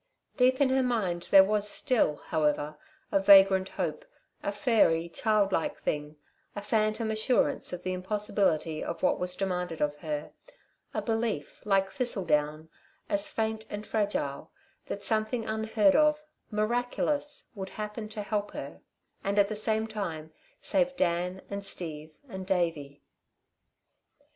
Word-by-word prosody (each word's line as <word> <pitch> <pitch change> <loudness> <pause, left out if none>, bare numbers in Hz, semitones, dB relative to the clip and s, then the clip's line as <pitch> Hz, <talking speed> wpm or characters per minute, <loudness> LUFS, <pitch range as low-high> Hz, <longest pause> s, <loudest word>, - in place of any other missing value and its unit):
Deep 260 -1 +3
in 280 -2 +4
her 265 0 +3
mind 200 -9 -1
there 195 -1 +9
was 210 +1 +1
still, 245 - +2
however, 150 -1 -1 0.4
a 195 - +3
vagrant 195 -1 +7
hope, - - -3 0.4
a - - -2
fairy, 205 - +2
child 205 +2 +1
like 165 - -1
thing, 150 0 -2 0.4
a 205 - -4
phantom 215 +1 0
assurance 220 +3 +1
of 180 - -6
the 185 - -2
impossibility 185 -5 0
of 170 +1 -5
what - - +2
was 180 0 -1
demanded 180 -3 -2
of 150 0 0
her, 150 -1 -4 0.6
a - - -3
belief, 225 - -2
like 195 -2 +3
thistle 225 -3 -2
down, 150 0 0 0.4
as 200 0 +1
faint 220 0 -2
and 205 +1 -6
fragile, 200 -10 -2 0.4
that 200 - -5
something 220 +2 +1
unheard 220 -2 +2
of, 300 0 +4 0.3
miraculous, 245 +7 -1
would 190 -3 -6
happen 215 0 -6
to 215 -1 -4
help 205 0 -2
her, - - -7 0.4
and 200 0 -1
at 200 -1 +4
the 215 - -3
same 220 +1 +1
time 170 -8 -5 0.3
save 270 -1 +1
Dan 180 +1 0
and 200 0 -5
Steve 160 -5 -3 0.2
and 190 -5 -7
Davey. 160 -7 -1
200 Hz, 145 wpm, -29 LUFS, 170-220 Hz, 0.6 s, there